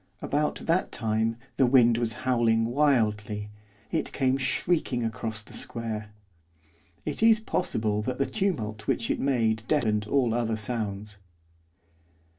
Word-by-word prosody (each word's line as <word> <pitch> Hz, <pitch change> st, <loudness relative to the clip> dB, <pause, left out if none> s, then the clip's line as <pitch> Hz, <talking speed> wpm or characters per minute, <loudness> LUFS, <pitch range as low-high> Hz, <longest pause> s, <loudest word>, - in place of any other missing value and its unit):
About 150 Hz, +1 st, 0 dB
that 170 Hz, +3 st, +1 dB
time 110 Hz, 0 st, 0 dB, 0.2 s
the 130 Hz, -, +4 dB
wind 120 Hz, -2 st, +5 dB
was 115 Hz, -2 st, 0 dB
howling 115 Hz, -3 st, +3 dB
wildly, 110 Hz, -6 st, +1 dB, 0.4 s
it -, -, -1 dB
came 130 Hz, -2 st, +1 dB
shrieking 135 Hz, -1 st, 0 dB
across 110 Hz, -2 st, -3 dB
the -, -, -14 dB
square. 110 Hz, -2 st, -3 dB, 1.0 s
It -, -, -2 dB
is 225 Hz, -1 st, +6 dB
possible 110 Hz, -, -1 dB
that 125 Hz, +4 st, -3 dB
the 140 Hz, -, +1 dB
tumult 110 Hz, -, -2 dB
which 115 Hz, -, 0 dB
it -, -, -1 dB
made 115 Hz, -5 st, +1 dB
deadened 110 Hz, -8 st, +1 dB
all 125 Hz, -2 st, +2 dB
other 115 Hz, -1 st, 0 dB
sounds. 105 Hz, -2 st, -4 dB
115 Hz, 130 wpm, -27 LUFS, 110-135 Hz, 1.0 s, is